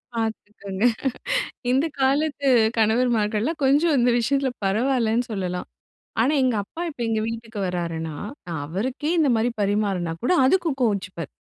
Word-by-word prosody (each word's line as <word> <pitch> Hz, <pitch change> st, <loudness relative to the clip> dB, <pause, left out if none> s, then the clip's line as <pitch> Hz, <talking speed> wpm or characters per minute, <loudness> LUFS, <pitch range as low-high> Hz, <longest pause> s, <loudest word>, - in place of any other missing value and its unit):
பார்த்துக்கோங்க. 210 Hz, -3 st, -4 dB, 0.9 s
இந்த 270 Hz, +5 st, +3 dB, 0.2 s
காலத்து 285 Hz, +1 st, +1 dB, 0.3 s
கணவர்மார்கள்லாம் 225 Hz, +4 st, +1 dB
கொஞ்சம் 290 Hz, +3 st, +4 dB
இந்த 245 Hz, +1 st, +4 dB
விஷயத்ல 270 Hz, +3 st, +1 dB, 0.2 s
பரவாயில்லன்னு 235 Hz, +2 st, +1 dB
சொல்லலாம். 180 Hz, -3 st, -3 dB, 0.5 s
ஆனா 265 Hz, +6 st, +3 dB
எங்க 250 Hz, -4 st, +2 dB
அப்பா 320 Hz, -, -10 dB
இப்ப 285 Hz, -, -13 dB
எங்க 220 Hz, -1 st, 0 dB
வீட்டுக்கு 230 Hz, -1 st, -6 dB
வராருன்னா, 165 Hz, -3 st, -3 dB, 0.3 s
நா 170 Hz, -, -5 dB
அவருக்கே 255 Hz, -, -2 dB
இந்த 300 Hz, -3 st, +4 dB
மாரி 230 Hz, +2 st, +1 dB
பரிமாறினா 200 Hz, -4 st, 0 dB
கூட 250 Hz, -, +2 dB
அதுக்கு 340 Hz, +3 st, +3 dB
கோவிச்சுப்பார். 190 Hz, -, -1 dB
225 Hz, 125 wpm, -24 LUFS, 200-265 Hz, 0.9 s, கொஞ்சம்